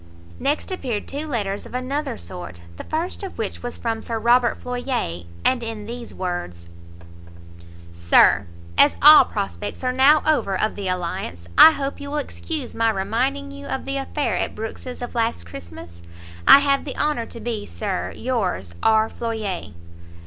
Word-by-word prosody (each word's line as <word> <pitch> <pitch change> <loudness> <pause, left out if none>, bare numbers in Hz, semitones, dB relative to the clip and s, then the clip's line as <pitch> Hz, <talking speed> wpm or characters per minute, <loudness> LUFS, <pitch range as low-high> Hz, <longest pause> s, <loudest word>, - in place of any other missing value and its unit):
Next 295 +6 -1
appeared 250 - -3
two 295 +3 -5
letters 205 -7 -3
of - - -10
another 275 - -2
sort; 85 -1 -9
the - - -7
first 330 +7 -3
of 390 -2 -7
which 220 -3 -4
was 245 0 -5
from 225 -1 -2
Sir 230 - -3
Robert 235 +2 +3
Floyer, 245 - -3 0.2
and 255 -1 +3
in 225 -2 -5
these 235 +1 -7
words; 175 - -5 1.3
Sir, 85 0 +4 0.3
As 285 - +6
all 300 +1 +9
prospects 205 +3 -5
are 255 - +1
now 280 +4 +5
over 200 -11 +1
of 215 - 0
the 200 -2 -4
alliance, 170 - -3
I - - +11
hope 280 -1 -4
you 285 - -6
will 295 - -2
excuse 295 -1 -4
my 230 0 +2
reminding 245 +8 -1
you 280 0 -9
of 265 - -3
the 275 0 -2
affair 270 -5 -1
at - - -2
Brookes's 245 +3 -6
of 245 - -6
last 225 - -1
Christmas. 85 0 -11 0.5
I 280 - +10
have 280 -1 +2
the - - -6
honour 295 -6 0
to 235 - -9
be, 220 -2 -4
Sir, 200 -4 -3
yours 190 - -2
R. 220 0 +4
FLOYER. 220 -6 -4
230 Hz, 165 wpm, -22 LUFS, 195-275 Hz, 1.3 s, I